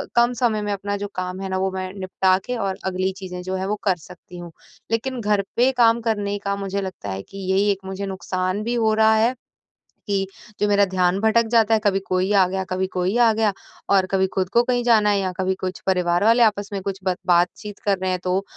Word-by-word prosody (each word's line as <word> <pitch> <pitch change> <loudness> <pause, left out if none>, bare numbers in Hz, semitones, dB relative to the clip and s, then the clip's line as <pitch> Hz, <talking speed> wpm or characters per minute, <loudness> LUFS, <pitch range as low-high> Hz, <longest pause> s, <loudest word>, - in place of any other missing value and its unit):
कम 240 +1 +4
समय 225 -3 0
में 205 0 -2
अपना 200 +1 -3
जो 205 0 -4
काम 185 0 -4
है 195 - -3
न 190 - -2
वो 190 0 +1
मैं 185 0 -4
निपटा 185 0 +2
के 250 - -3
और 195 -3 -2
अगली 190 0 -1
चीज़ें 180 -2 -7
जो 185 +1 -3
हैं 190 0 -2
वो 210 +2 -1
कर 190 -3 +2
सकती 180 +1 -13
हूँ। 175 -1 -9 0.4
लेकिन 250 +2 -1
घर 205 -1 +2
पे 250 +3 +4
काम 230 0 +4
करने 205 -3 -1
का 200 0 -2
मुझे 200 0 -3
लगता 190 -1 -6
है 95 0 -4
कि 195 - -13
यही 200 +2 +3
एक 195 - -2
मुझे 190 +1 -4
नुकसान 185 0 -2
भी 235 +2 -2
हो 220 -2 +2
रहा 220 0 +4
है 230 +3 +3 0.7
कि 195 -1 0 0.3
जो 210 - +2
मेरा 200 0 +4
ध्यान 185 0 +1
भटक 225 +1 +3
जाता 225 -1 +4
है 220 - +4
कभी 195 -1 +2
कोई 185 +2 0
आ 190 -2 +5
गया, 190 0 -2
कभी 185 0 -2
कोई 185 +5 -1
आ 235 -2 +5
गया 215 -2 +1 0.4
और 195 -2 +4
कभी 190 0 +2
खुद 185 -1 0
को 235 +3 +3
कहीं 245 -1 0
जाना 220 -3 +4
है 200 -1 +2
या 185 -1 -1
कभी 190 0 0
कुछ 185 0 -4
परिवार 180 -1 +2
वाले 230 +1 +5
आपस 205 -2 +1
में 195 - -3
कुछ 195 0 -4
ब 185 -2 0
बात-चीत 180 +4 +1
कर 200 -2 +2
रहे 185 0 -1
हैं 180 - -1
तो 185 +2 0
195 Hz, 240 wpm, -22 LUFS, 185-215 Hz, 0.7 s, आ